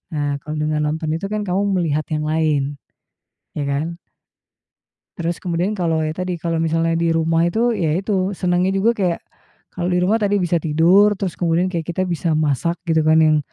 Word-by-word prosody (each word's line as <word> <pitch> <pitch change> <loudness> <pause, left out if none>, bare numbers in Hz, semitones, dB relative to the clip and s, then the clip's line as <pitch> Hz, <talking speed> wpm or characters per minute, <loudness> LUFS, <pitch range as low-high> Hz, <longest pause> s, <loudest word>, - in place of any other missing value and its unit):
Nah 145 -1 -1
kalau 155 0 -5
dengan 150 0 0
nonton 155 0 -3
itu 170 +4 -4
kan 210 +1 -2
kamu 190 0 0
melihat 155 -4 0
yang 155 0 -1
lain, 150 -3 0 0.8
ya 150 - -2
kan. 155 +5 -2 1.2
Terus 170 -1 -3
kemudian 180 +3 -1
kalau 165 -5 0
ya 155 - -2
tadi, 180 +1 -3
kalau 165 0 -2
misalnya 165 0 +1
di 165 0 +1
rumah 165 +1 +2
itu, 230 +7 +1
ya 160 -7 0
itu, 195 0 -1
senangnya 180 0 +1
juga 205 +4 +3
kayak 185 -6 -1 0.5
kalau 175 -1 -2
di 180 0 +2
rumah 205 +5 +3
tadi 205 0 +2
bisa 175 -1 +1
tidur, 175 +7 +4
terus 190 -2 -3
kemudian 175 +1 +1
kayak 165 -3 -3
kita 175 +2 -1
bisa 170 -2 -1
masak 155 +3 0
gitu 160 -2 +2
kan 155 0 +5
yang, 155 -1 +4
170 Hz, 185 wpm, -20 LUFS, 155-185 Hz, 1.2 s, kan